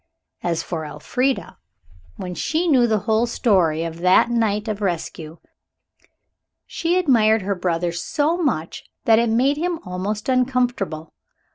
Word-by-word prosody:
As 170 -2 -1
for 165 -3 -4
Elfrida, 255 - -2 0.6
when 180 -1 -6
she 320 - -1
knew 255 -6 +4
the 215 -3 +1
whole 220 +2 +1
story 180 -10 +2
of 165 0 -6
that 185 +6 +4
night 220 -2 0
of 215 -1 -3
rescue, 165 -3 -4 1.3
she 340 +2 -1
admired 225 - +3
her 200 +1 0
brother 175 -2 -1
so 295 - -1
much 255 - -2 0.2
that 225 -1 +5
it 235 -1 +1
made 260 +6 +2
him 345 +2 -1
almost 195 +4 -4
uncomfortable. 250 - 0
220 Hz, 135 wpm, -21 LUFS, 180-255 Hz, 1.3 s, that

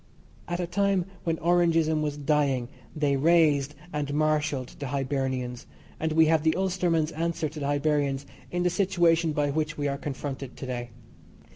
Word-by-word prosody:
At 175 0 -2
a 180 - 0
time 195 0 +1 0.2
when 165 -1 0
Orangeism 165 -2 +2
was 150 -1 -2
dying 140 -4 +1 0.3
they 145 -3 +1
raised 150 -2 +3 0.2
and 145 -1 -2
marshalled 150 -4 +1
the 140 - -4
Hibernians, 130 -2 -2 0.3
and 160 0 -1
we 160 0 +6
have 160 0 +3
the 160 0 +2
Ulsterman's 175 -4 +1
answer 165 0 -1
to 155 +1 -8
the 140 - -2
Hibernians 145 -1 0 0.2
in 175 0 -1
the 180 - +2
situation 170 -4 +2
by 145 -1 0
which 155 +1 -2
we 145 -1 -1
are 140 0 -2
confronted 135 -2 -5
to - - -6
day. 120 -1 -4
150 Hz, 165 wpm, -27 LUFS, 140-165 Hz, 0.3 s, we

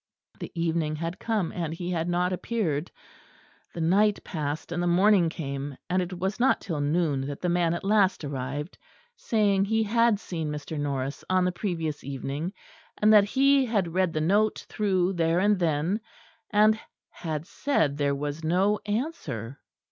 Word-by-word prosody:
The - - -6
evening 165 -2 0
had 165 +3 -4
come, 215 -7 -1
and 165 -2 -3
he 175 +1 -4
had 170 -1 -1
not 180 +1 +1
appeared. 180 -7 -2 0.9
The 170 - -3
night 200 +5 +3
passed 150 -1 -4
and 175 0 -1
the 175 - 0
morning 180 0 +4
came; 140 -4 -5
and 185 +1 +2
it 180 0 -4
was 190 +5 -2
not 260 +3 +3
till 160 -6 -3
noon 145 -3 0
that 145 -1 -5
the 180 - -1
man 170 -1 +2
at 170 - -5
last 195 -3 +2
arrived, 140 +3 -4 0.4
saying 205 - +2
he 220 +2 +1
had 230 0 +3
seen 165 -7 -4
Mr. 150 +1 -5
Norris 140 -1 -3
on 185 -1 +3
the 180 - +1
previous 170 -5 -3
evening, 140 +5 -4 0.5
and 215 +1 +5
that 205 -2 +7
he 275 +5 +4
had 195 -7 0
read 185 -1 +2
the 155 - -1
note 205 +6 +2
through 190 -3 +1
there 165 -1 +1
and 200 +1 +3
then, 170 +5 0 0.5
and 215 +1 +4 0.3
had 155 -3 -4
said 175 - 0
there 140 -1 +1
was 145 +3 -4
no 190 +6 +2
answer. 150 - -3
175 Hz, 170 wpm, -27 LUFS, 150-205 Hz, 0.9 s, that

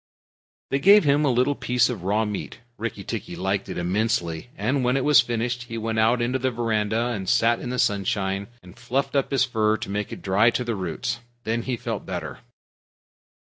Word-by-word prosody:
They 135 - +2
gave 200 +7 +7
him 145 0 +3
a 145 - +3
little 125 +4 +2
piece 125 -3 +1
of 120 -7 -4
raw 105 +4 +1
meat. 105 -2 -5 0.2
Rikki 115 0 -4
tikki - - -5
liked 95 +1 -2
it - - -5
immensely, 90 0 -1
and 135 0 0
when 125 +2 +2
it 135 - -1
was 150 -1 +7
finished 120 +1 -2
he 115 -1 -6
went 110 0 -1
out 120 +2 +3
into 125 +2 0
the 130 +1 +1
veranda 115 -1 0
and 100 -6 -3
sat 120 0 +3
in - - -5
the 125 - -3
sunshine 100 -2 0 0.2
and 90 -1 -14
fluffed 130 +4 -2
up 140 - +1
his 135 -2 +2
fur 110 -4 +1
to 100 - -6
make 105 0 -3
it - - -8
dry 100 +5 +4
to 125 - -1
the 120 -1 -2
roots. 95 +3 -3 0.2
Then 115 +1 -1
he 125 0 -3
felt - - -4
better. - - -5
115 Hz, 205 wpm, -24 LUFS, 105-125 Hz, 0.2 s, gave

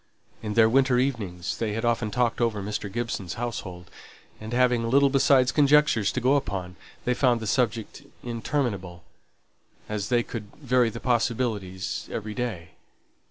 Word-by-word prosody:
In 105 -1 -4
their 110 -1 +6
winter 130 +1 +3
evenings 105 -10 -2
they 110 -2 -1
had 115 +2 -2
often 115 -2 +1
talked 120 +2 0
over 110 -4 0
Mr. 100 -1 -4
Gibson's 110 -6 -3
household, 95 -7 -6 0.5
and 110 +1 -8
having 120 -2 +2
little 140 +2 +4
besides 135 -2 +4
conjecture 150 -5 +4
to 105 - 0
go 130 +3 +3
upon, 95 -8 -4 0.3
they 125 - +2
found 125 -2 +2
the 110 - -6
subject 115 -1 -1 0.2
interminable, 115 -7 -3 0.8
as 105 -2 -3
they 120 -1 +3
could 105 -4 -8
vary 125 -4 +2
the 115 - -7
possibilities 110 -6 -1
every 110 -1 -4
day. 105 -8 -4
115 Hz, 150 wpm, -26 LUFS, 105-125 Hz, 0.8 s, their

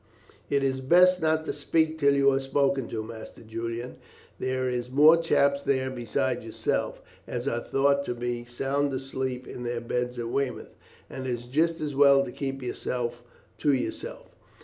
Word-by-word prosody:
"It 140 -1 +2
is 130 -1 0
best 180 +6 +5
not 160 0 +1
to - - -2
speak 160 -1 0
till 140 -1 +4
you 140 0 +5
are 135 - +1
spoken 135 -1 +1
to, 110 -1 -4
Master 110 +1 -10
Julian; 115 +2 -5 0.4
there 130 0 -1
is 125 -1 -2
more 150 +5 +7
chaps 140 -4 +2
there 130 -2 0
besides 125 0 -1
yourself, 110 -1 -2 0.2
as 125 +2 -4
are 120 -4 0
thought 140 +2 +2
to 120 - -3
be 120 0 -3
sound 135 +4 -1
asleep 130 -1 -4
in - - -8
their 120 -1 -2
beds 125 +1 -2
at 115 -1 -3
Weymouth, 135 -1 -3 0.3
and 130 0 -6
it - - -2
is 120 -1 -3
just 160 +6 +1
as 150 -2 -2
well 140 0 +6
to - - -7
keep 135 0 -4
yourself 120 -1 -3 0.4
to 145 - +3
yourself. 465 - -4
130 Hz, 175 wpm, -27 LUFS, 120-140 Hz, 0.4 s, more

